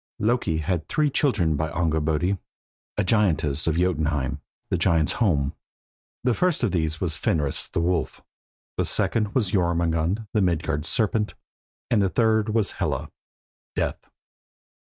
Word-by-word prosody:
Loki 110 -7 +1
had 85 +1 -1
three 150 -2 +1
children 105 - +2
by 80 +2 -1
Angurbodi, 80 +3 0 0.6
a - - +2
giantess 85 -8 +1
of 80 - +2
Jotunheim 75 -6 0 0.3
(the - - +3
giants' 80 -2 +2
home). 75 -11 +2 0.7
The 125 -1 +3
first 180 0 +1
of 115 - +2
these 80 -3 -1
was 85 -5 -1
Fenris, 75 -4 0
the - - -2
wolf; 85 -1 0 0.6
the - - +1
second 105 -2 0
was 110 -8 +1
Jörmungand, 85 +2 +1
the 105 - +3
Midgard 80 -4 0
serpent; 105 +2 0 0.6
and 110 -4 +4
the 95 - +2
third 110 0 +2
was 110 -2 +1
Hela, - - -2 0.6
death. - - -1
90 Hz, 135 wpm, -25 LUFS, 80-105 Hz, 0.7 s, and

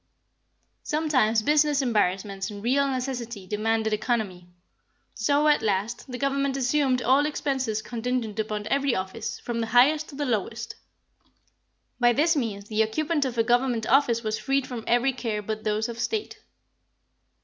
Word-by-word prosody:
Sometimes 255 -8 +1
business 295 +1 +3
embarrassments 195 -3 0
and 205 -1 -8
real 275 +4 +2
necessity 250 -6 -4
demanded 220 +2 0
economy; 215 -5 -2 0.7
so, 285 +7 +2
at 300 - +4
last, 220 +5 -2
the 250 - -4
Government 275 0 0
assumed 260 -1 +1
all 265 +4 +4
the 295 - 0
expenses 260 -7 -2
contingent 235 -2 -3
upon 210 -1 -2
every 275 -2 +2
office, 190 0 -4
from 235 -1 -3
the 225 - -1
highest 275 +7 +4
to 280 - -10
the 290 +1 -2
lowest. 230 -1 -2 1.2
By 240 -1 +4
this 320 +6 +3
means 220 -8 -2
the 215 0 0
occupant 295 +6 0
of 250 -2 -4
a 230 - +4
Government 245 -1 +1
office 240 -2 +3
was 215 0 -2
freed 270 +4 0
from 240 -3 -6
every 245 +3 +2
care 225 -4 -3
but 215 +1 -4
those 215 +1 0
of 235 -1 -7
state. 430 - -3
240 Hz, 155 wpm, -26 LUFS, 215-275 Hz, 1.2 s, at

